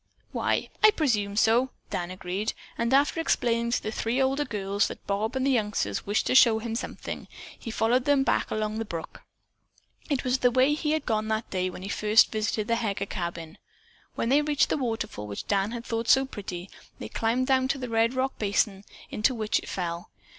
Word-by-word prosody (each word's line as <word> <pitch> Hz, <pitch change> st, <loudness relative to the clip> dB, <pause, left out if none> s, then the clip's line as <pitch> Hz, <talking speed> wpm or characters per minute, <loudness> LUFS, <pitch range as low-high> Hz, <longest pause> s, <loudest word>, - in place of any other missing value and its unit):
"Why, -, -, 0 dB
I 430 Hz, -, +10 dB
presume 225 Hz, -, 0 dB
so," 230 Hz, +4 st, +3 dB, 0.2 s
Dan 175 Hz, -1 st, -2 dB
agreed, 185 Hz, +3 st, -3 dB, 0.2 s
and 235 Hz, +1 st, -1 dB
after 285 Hz, +4 st, +3 dB
explaining 235 Hz, -7 st, +1 dB
to 235 Hz, -, 0 dB
the 215 Hz, -, -3 dB
three 230 Hz, +3 st, -1 dB
older 270 Hz, +2 st, +1 dB
girls 200 Hz, -3 st, 0 dB
that -, -, -9 dB
Bob 210 Hz, +5 st, -1 dB
and 260 Hz, 0 st, 0 dB
the 275 Hz, -, +3 dB
youngsters 215 Hz, -6 st, -1 dB
wished 205 Hz, +2 st, +1 dB
to -, -, +1 dB
show 235 Hz, -4 st, +7 dB
him 225 Hz, 0 st, -4 dB
something, 230 Hz, -, -5 dB, 0.3 s
he -, -, -7 dB
followed 235 Hz, +3 st, +1 dB
them 285 Hz, -2 st, +4 dB
back -, -, +1 dB
along 215 Hz, 0 st, -2 dB
the -, -, -1 dB
brook. 165 Hz, -6 st, -7 dB, 0.9 s
It 280 Hz, -4 st, 0 dB
was 255 Hz, 0 st, +1 dB
the 250 Hz, -, +4 dB
way 260 Hz, +4 st, +3 dB
that 300 Hz, -, -4 dB
he 300 Hz, 0 st, +1 dB
had 315 Hz, -2 st, -1 dB
gone 215 Hz, -2 st, 0 dB
on 220 Hz, 0 st, +1 dB
that 220 Hz, -, -10 dB
day 185 Hz, -1 st, 0 dB
when 185 Hz, -, -9 dB
he 195 Hz, -, -5 dB
had -, -, -2 dB
first 215 Hz, +1 st, +5 dB
visited 215 Hz, -1 st, -1 dB
the 230 Hz, 0 st, +2 dB
Heger 205 Hz, -4 st, -2 dB
cabin. 170 Hz, -4 st, -5 dB, 0.6 s
When 230 Hz, -, -1 dB
they 285 Hz, +3 st, +5 dB
reached 295 Hz, -1 st, +2 dB
the -, -, +1 dB
waterfall 225 Hz, -, -3 dB
which 100 Hz, -, -6 dB
Dan 200 Hz, 0 st, +1 dB
had 235 Hz, 0 st, -6 dB
thought 230 Hz, 0 st, -2 dB
so 265 Hz, 0 st, +6 dB
pretty, 190 Hz, -7 st, -7 dB, 0.3 s
they -, -, -6 dB
climbed 235 Hz, +3 st, 0 dB
down 260 Hz, 0 st, +2 dB
to 275 Hz, -, 0 dB
the 255 Hz, -2 st, -5 dB
red 230 Hz, +2 st, +1 dB
rock 260 Hz, +1 st, -1 dB
basin 200 Hz, -1 st, 0 dB, 0.3 s
into 220 Hz, +4 st, +1 dB
which 215 Hz, -2 st, 0 dB
it -, -, -10 dB
fell. 170 Hz, -2 st, -4 dB
225 Hz, 215 wpm, -27 LUFS, 205-260 Hz, 0.9 s, I